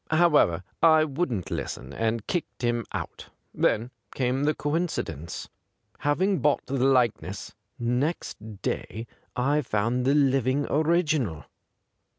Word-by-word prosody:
However, 150 - +4 0.2
I 160 -1 +6
wouldn't 135 - -2
listen, 65 +2 -4
and 115 +2 -1
kicked 175 -7 -3
him 120 -1 0
out. - - -6 0.2
Then 115 +4 +1 0.2
came 130 +2 +1
the 150 - +2
coincidence. 145 - -2 0.5
Having 185 +7 +1
bought 150 -1 +2
the 130 -1 -1
likeness, 120 -7 +1 0.2
next 120 - -2
day 110 +2 -3 0.3
I 140 +4 +2
found 120 +1 0
the 140 +2 +4
living 135 -1 +3
original. 155 - +1
130 Hz, 115 wpm, -27 LUFS, 115-150 Hz, 0.5 s, I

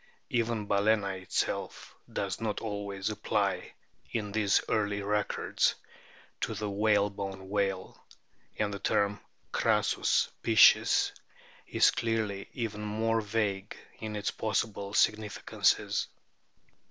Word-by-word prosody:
Even 115 -2 0
Balcena 100 -2 +1
itself 95 - -3 0.2
does - - -3
not 110 -2 -1
always 100 -1 -3
apply 100 -3 -1 0.3
in 105 -3 -3
these 105 -1 +3
early 105 -2 0
records 105 0 +1 0.6
to 110 - -2
the 105 +1 -3
whale 105 0 +2
bone 95 -1 -6
whale, 100 -2 -2 0.5
and 105 -1 0
the 100 - -5
term 100 +1 +1 0.2
" - - -41
crassus - - +2
piscis" 110 -2 +6 0.6
is - - +4
clearly 110 -4 -2
even 110 -3 -4
more 110 +2 0
vague 105 -2 -2 0.2
in 110 -1 -5
its 105 -1 -1
possible 105 -2 -2
significances. 105 -1 +1
105 Hz, 110 wpm, -30 LUFS, 100-110 Hz, 0.6 s, piscis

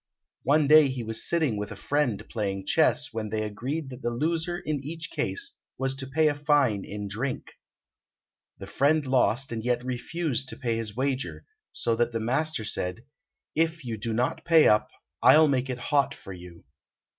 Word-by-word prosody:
One 145 +1 +3
day 155 0 +8
he 130 -2 -4
was 110 0 +1
sitting 155 -10 +1
with 105 +1 -4
a - - -6
friend 135 0 -1
playing 100 -3 -3
chess, - - +2
when 110 -1 -3
they 110 0 -1
agreed 135 +8 -4
that 125 +1 -9
the 120 - -1
loser 165 +7 -1
in 150 -4 -3
each 160 +3 -6
case 95 - -2 0.2
was 135 0 0
to 135 0 -6
pay 155 +4 +2
a 150 - +2
fine 145 -8 +2
in 105 0 -6
drink. 120 +6 -4 1.0
The - - -8
friend 145 +2 +2
lost 130 0 +2
and 110 -1 -4
yet 125 0 0
refused 135 +1 -2
to - - -5
pay 120 -4 -1
his 110 -2 -5
wager, 135 +1 -2 0.3
so 115 -1 0
that 120 0 +1
the 115 - -1
master 135 +3 -1
said, 100 +2 -3 0.5
"If 165 -1 0
you 115 -2 -3
do 110 +2 -4
not 120 +3 -1
pay 165 -2 +6
up 105 0 +3 0.3
I'll 155 0 +7
make 135 -2 0
it 125 - -2
hot 140 +2 +1
for 100 - -10
you." 90 -1 -12
130 Hz, 185 wpm, -27 LUFS, 110-150 Hz, 1.0 s, day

